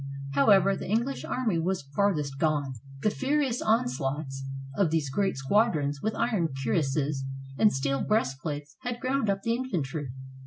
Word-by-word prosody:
However, 195 Hz, +7 st, +5 dB
the -, -, -6 dB
English 235 Hz, +6 st, 0 dB
army 225 Hz, -9 st, 0 dB
was 180 Hz, 0 st, -1 dB
farthest 145 Hz, -2 st, 0 dB
gone. 145 Hz, -4 st, +1 dB, 0.3 s
The 215 Hz, -, +3 dB
furious 270 Hz, -1 st, 0 dB
onslaughts 135 Hz, -, 0 dB, 0.3 s
of 195 Hz, -5 st, +3 dB
these 155 Hz, -4 st, 0 dB
great 195 Hz, +3 st, 0 dB
squadrons, 145 Hz, -, +2 dB
with 220 Hz, -, -1 dB
iron 220 Hz, -8 st, +1 dB, 0.2 s
cuirasses 135 Hz, +2 st, 0 dB, 0.4 s
and 215 Hz, -, +6 dB
steel 135 Hz, 0 st, 0 dB
breastplates 145 Hz, -, -1 dB
had 245 Hz, -2 st, -3 dB
ground 260 Hz, -4 st, 0 dB
up 195 Hz, 0 st, 0 dB
the 230 Hz, -, +1 dB
infantry. 160 Hz, -, -2 dB
165 Hz, 145 wpm, -28 LUFS, 140-220 Hz, 0.4 s, and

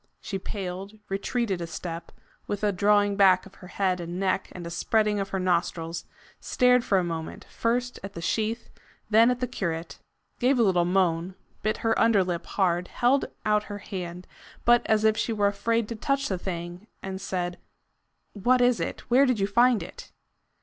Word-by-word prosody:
She 195 Hz, -3 st, -4 dB
paled, 195 Hz, +1 st, -6 dB
retreated 195 Hz, -1 st, -1 dB
a 170 Hz, -, -4 dB
step, 165 Hz, 0 st, -6 dB, 0.4 s
with 205 Hz, 0 st, -3 dB
a 205 Hz, -, +3 dB
drawing 205 Hz, +1 st, +3 dB
back 190 Hz, -2 st, +5 dB
of 195 Hz, -, -14 dB
her 180 Hz, -, -10 dB
head 185 Hz, -1 st, 0 dB
and 175 Hz, +1 st, -5 dB
neck 190 Hz, 0 st, 0 dB
and 175 Hz, -2 st, -8 dB
a 170 Hz, -, -6 dB
spreading 210 Hz, +3 st, +1 dB
of 195 Hz, 0 st, -3 dB
her 195 Hz, -, -2 dB
nostrils, 170 Hz, -2 st, -1 dB, 0.3 s
stared 250 Hz, -1 st, +3 dB
for 195 Hz, -, +2 dB
a 185 Hz, -, +2 dB
moment, 165 Hz, -2 st, -5 dB
first 245 Hz, +2 st, -1 dB
at 195 Hz, 0 st, -7 dB
the -, -, -5 dB
sheath, 220 Hz, +6 st, -2 dB, 0.4 s
then 225 Hz, +3 st, +6 dB
at 250 Hz, 0 st, -1 dB
the 250 Hz, -, 0 dB
curate, 170 Hz, -8 st, -4 dB, 0.4 s
gave 260 Hz, +2 st, +3 dB
a 235 Hz, -, +4 dB
little 180 Hz, -4 st, +3 dB
moan, 180 Hz, -1 st, +1 dB, 0.3 s
bit 215 Hz, +1 st, 0 dB
her 225 Hz, -, +4 dB
under 225 Hz, -4 st, +4 dB
lip 175 Hz, -2 st, -4 dB
hard, 180 Hz, -2 st, 0 dB
held 255 Hz, +3 st, +2 dB, 0.2 s
out 210 Hz, 0 st, +2 dB
her 205 Hz, -, -6 dB
hand, 180 Hz, -3 st, -6 dB, 0.4 s
but 240 Hz, 0 st, +6 dB
as 215 Hz, -1 st, +3 dB
if 220 Hz, 0 st, +4 dB
she -, -, -1 dB
were 205 Hz, -2 st, +1 dB
afraid 220 Hz, +3 st, +1 dB
to 230 Hz, -, -4 dB
touch 275 Hz, +5 st, -1 dB
the 190 Hz, -3 st, -2 dB
thing, 175 Hz, +2 st, -6 dB, 0.2 s
and 190 Hz, 0 st, -5 dB
said: 175 Hz, -2 st, -3 dB, 0.7 s
"What 245 Hz, +5 st, +2 dB
is 245 Hz, -1 st, +3 dB
it? -, -, -3 dB
Where 265 Hz, +3 st, +4 dB
did 250 Hz, -4 st, +1 dB
you 195 Hz, -, +2 dB
find 235 Hz, +3 st, +3 dB
it?" -, -, -11 dB
200 Hz, 190 wpm, -26 LUFS, 180-225 Hz, 0.7 s, then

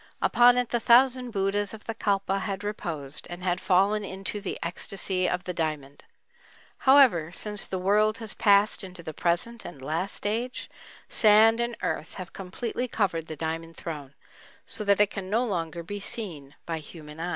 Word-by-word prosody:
Upon 245 Hz, 0 st, +5 dB
it 245 Hz, -1 st, 0 dB
the 240 Hz, -, 0 dB
thousand 250 Hz, +2 st, +4 dB
Buddhas 205 Hz, 0 st, 0 dB
of 215 Hz, -, -14 dB
the 225 Hz, -, -4 dB
Kalpa 195 Hz, -2 st, 0 dB
had 195 Hz, +1 st, -4 dB
reposed 160 Hz, -9 st, -4 dB
and 175 Hz, +1 st, -8 dB
had 180 Hz, 0 st, 0 dB
fallen 195 Hz, +3 st, +2 dB
into 195 Hz, +1 st, -4 dB
the 195 Hz, -, -4 dB
"ecstasy 185 Hz, +1 st, -2 dB
of 180 Hz, -, -2 dB
the 180 Hz, -, -4 dB
diamond." 155 Hz, -4 st, -4 dB, 0.8 s
However, 235 Hz, -, +6 dB
since 210 Hz, +2 st, -1 dB
the 190 Hz, -, -3 dB
world 210 Hz, +4 st, +2 dB
has 225 Hz, -2 st, -4 dB
passed 200 Hz, 0 st, +4 dB
into 180 Hz, -2 st, -8 dB
the 155 Hz, -, -6 dB
present 175 Hz, +10 st, +1 dB
and 150 Hz, -, -9 dB
last 160 Hz, +11 st, -3 dB
age, 235 Hz, +4 st, -2 dB, 0.4 s
sand 220 Hz, +1 st, +5 dB
and 235 Hz, -1 st, -2 dB
earth 165 Hz, -, -3 dB
have 185 Hz, -2 st, -8 dB
completely 230 Hz, +6 st, -4 dB
covered 170 Hz, -9 st, -1 dB
the 155 Hz, -, -6 dB
"Diamond 165 Hz, +2 st, -4 dB
Throne," 145 Hz, -5 st, -7 dB, 0.5 s
so 215 Hz, -, -3 dB
that 200 Hz, 0 st, +3 dB
it 210 Hz, -1 st, +4 dB
can 190 Hz, -2 st, -6 dB
no 230 Hz, +5 st, +1 dB
longer 170 Hz, -5 st, -3 dB
be 205 Hz, +4 st, -6 dB
seen 165 Hz, -10 st, -5 dB
by 165 Hz, -1 st, -3 dB
human 150 Hz, 0 st, -11 dB
eye. 175 Hz, +2 st, -3 dB
195 Hz, 175 wpm, -27 LUFS, 170-215 Hz, 0.8 s, However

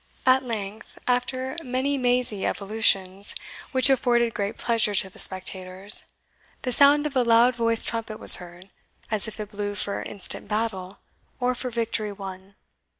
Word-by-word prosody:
At 260 Hz, +1 st, +3 dB
length, 215 Hz, -3 st, -8 dB
after 255 Hz, +1 st, -2 dB
many 260 Hz, +1 st, -3 dB
mazy 245 Hz, -5 st, -1 dB
evolutions, 200 Hz, -2 st, 0 dB, 0.4 s
which 260 Hz, -1 st, +2 dB
afforded 240 Hz, -3 st, +1 dB
great 205 Hz, +2 st, -5 dB
pleasure 225 Hz, -3 st, 0 dB
to 190 Hz, 0 st, +1 dB
the -, -, -14 dB
spectators, 185 Hz, +1 st, +2 dB, 0.6 s
the 255 Hz, -, -3 dB
sound 285 Hz, +3 st, +4 dB
of 290 Hz, -2 st, -5 dB
a 255 Hz, -, +2 dB
loud 235 Hz, +1 st, +3 dB
voiced 230 Hz, -1 st, +2 dB
trumpet 225 Hz, -2 st, -5 dB
was -, -, +11 dB
heard, 180 Hz, +2 st, -14 dB, 0.4 s
as 215 Hz, 0 st, -1 dB
if 220 Hz, -, -10 dB
it 210 Hz, -1 st, -8 dB
blew 205 Hz, -1 st, -5 dB
for 200 Hz, +1 st, -3 dB
instant 200 Hz, -3 st, -8 dB
battle, 210 Hz, -4 st, -4 dB, 0.4 s
or 250 Hz, 0 st, -1 dB
for 250 Hz, +1 st, -5 dB
victory 225 Hz, -2 st, -4 dB
won. 195 Hz, -1 st, -11 dB
225 Hz, 150 wpm, -23 LUFS, 200-250 Hz, 0.6 s, was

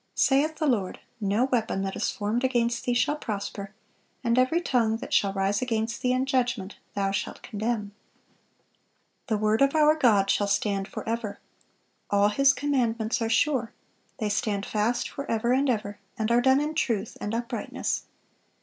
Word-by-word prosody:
Saith 290 Hz, +4 st, +3 dB
the 310 Hz, -, -2 dB
Lord, 215 Hz, -10 st, 0 dB, 0.2 s
"No 205 Hz, +3 st, +1 dB
weapon 225 Hz, -7 st, 0 dB
that 195 Hz, 0 st, -3 dB
is -, -, 0 dB
formed 215 Hz, +4 st, -2 dB
against 240 Hz, -2 st, +1 dB
thee 245 Hz, -, +1 dB
shall 295 Hz, +5 st, +1 dB
prosper; 200 Hz, -4 st, -5 dB, 0.5 s
and 235 Hz, -1 st, +2 dB
every 255 Hz, +7 st, +3 dB
tongue 235 Hz, -9 st, +1 dB
that -, -, -7 dB
shall 200 Hz, -, +3 dB
rise 195 Hz, +1 st, 0 dB
against 230 Hz, -2 st, -2 dB
thee 250 Hz, -, +1 dB
in 255 Hz, +1 st, +1 dB
judgment 245 Hz, -7 st, -1 dB, 0.2 s
thou 195 Hz, -1 st, 0 dB
shalt 195 Hz, -, -4 dB
condemn."(428) 215 Hz, -2 st, -8 dB
"The 220 Hz, -, +1 dB
word 215 Hz, +2 st, +1 dB
of 275 Hz, +2 st, +4 dB
our 305 Hz, 0 st, +6 dB
God 220 Hz, -10 st, +4 dB
shall 205 Hz, -, +1 dB
stand 200 Hz, -1 st, 0 dB
forever." 225 Hz, -2 st, -4 dB, 0.7 s
"All 200 Hz, 0 st, +4 dB
His 275 Hz, +6 st, +5 dB
commandments 240 Hz, -6 st, 0 dB
are 225 Hz, -, 0 dB
sure. 255 Hz, -2 st, +1 dB, 0.4 s
They 215 Hz, -4 st, -1 dB
stand 200 Hz, 0 st, -1 dB
fast 225 Hz, +3 st, 0 dB
forever 235 Hz, -3 st, -1 dB
and 270 Hz, +1 st, +2 dB
ever, 210 Hz, -4 st, -2 dB, 0.2 s
and 220 Hz, +1 st, -1 dB
are 240 Hz, +1 st, +4 dB
done 265 Hz, +2 st, +4 dB
in 300 Hz, +2 st, -1 dB
truth 230 Hz, -9 st, -1 dB
and 210 Hz, +2 st, -2 dB
uprightness." 235 Hz, 0 st, -3 dB
230 Hz, 165 wpm, -26 LUFS, 205-255 Hz, 0.7 s, our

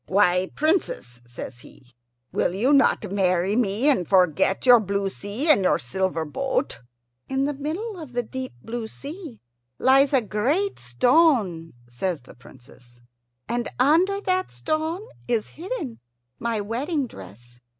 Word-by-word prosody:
"Why, 185 Hz, -1 st, +3 dB
Princess," 295 Hz, -, -1 dB
says 120 Hz, +1 st, -8 dB
he, 125 Hz, 0 st, -17 dB, 0.4 s
"will 175 Hz, -, 0 dB
you 250 Hz, +9 st, +2 dB
not 270 Hz, -8 st, +3 dB
marry 185 Hz, 0 st, +1 dB
me, 225 Hz, +2 st, +1 dB
and 220 Hz, -, +3 dB
forget 185 Hz, -, +3 dB
your 245 Hz, -2 st, +8 dB
blue 200 Hz, -1 st, -1 dB
sea 205 Hz, +12 st, -4 dB
and 250 Hz, -11 st, +5 dB
your 185 Hz, -, +3 dB
silver 165 Hz, +5 st, -2 dB
boat?" 265 Hz, -, -2 dB, 0.5 s
"In 270 Hz, +1 st, 0 dB
the 290 Hz, -, -1 dB
middle 345 Hz, +9 st, -4 dB
of 300 Hz, -6 st, -9 dB
the 245 Hz, 0 st, 0 dB
deep 260 Hz, +3 st, -6 dB
blue 230 Hz, -1 st, -4 dB
sea 290 Hz, -, -9 dB, 0.4 s
lies 270 Hz, +2 st, +4 dB
a 270 Hz, -3 st, +4 dB
great 275 Hz, -, 0 dB
stone," 185 Hz, -, +2 dB
says 145 Hz, +6 st, -3 dB
the 125 Hz, -, -15 dB
Princess, 120 Hz, -1 st, -18 dB, 0.4 s
"and 240 Hz, 0 st, -2 dB
under 335 Hz, +10 st, +3 dB
that 370 Hz, -1 st, 0 dB
stone 315 Hz, +5 st, -2 dB, 0.2 s
is 235 Hz, -3 st, 0 dB
hidden 335 Hz, -, -6 dB, 0.4 s
my 230 Hz, -2 st, -1 dB
wedding 270 Hz, -, -2 dB
dress. 120 Hz, -, -13 dB
230 Hz, 140 wpm, -24 LUFS, 180-290 Hz, 0.5 s, your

